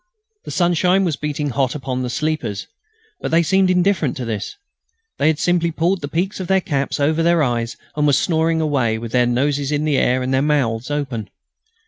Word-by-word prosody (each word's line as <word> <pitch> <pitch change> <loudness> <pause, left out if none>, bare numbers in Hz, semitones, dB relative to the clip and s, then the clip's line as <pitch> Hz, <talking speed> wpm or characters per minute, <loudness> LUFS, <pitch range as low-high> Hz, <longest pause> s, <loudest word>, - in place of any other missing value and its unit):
The - - -7
sunshine 180 +2 +2
was 165 -4 0
beating 150 -1 -3
hot 130 0 0
upon 130 -3 -3
the 125 - -3
sleepers, 140 -8 -2 0.5
but - - -3
they 165 +1 +3
seemed 190 +2 +3
indifferent 180 -6 +1
to 125 - -4
this. 110 -3 -4 0.6
They - - +3
had 160 -1 +2
simply 175 0 +1
pulled 170 +3 0
the 145 - -4
peaks 180 +8 -2
of 185 - -4
their 190 +1 +3
caps 145 -7 -2
over 155 +3 +2
their 170 -1 +3
eyes 120 -3 -1 0.2
and 150 -1 +2
were 145 - +3
snoring 160 +2 +1
away, 130 -8 +1
with 115 0 -7
their 125 -1 +3
noses 140 +3 0
in 150 +1 0
the 145 -3 +2
air 125 +1 +1
and 130 +1 -1
their 130 - +3
mouths 130 -5 0
open. 135 -8 -3
150 Hz, 200 wpm, -20 LUFS, 130-165 Hz, 0.6 s, they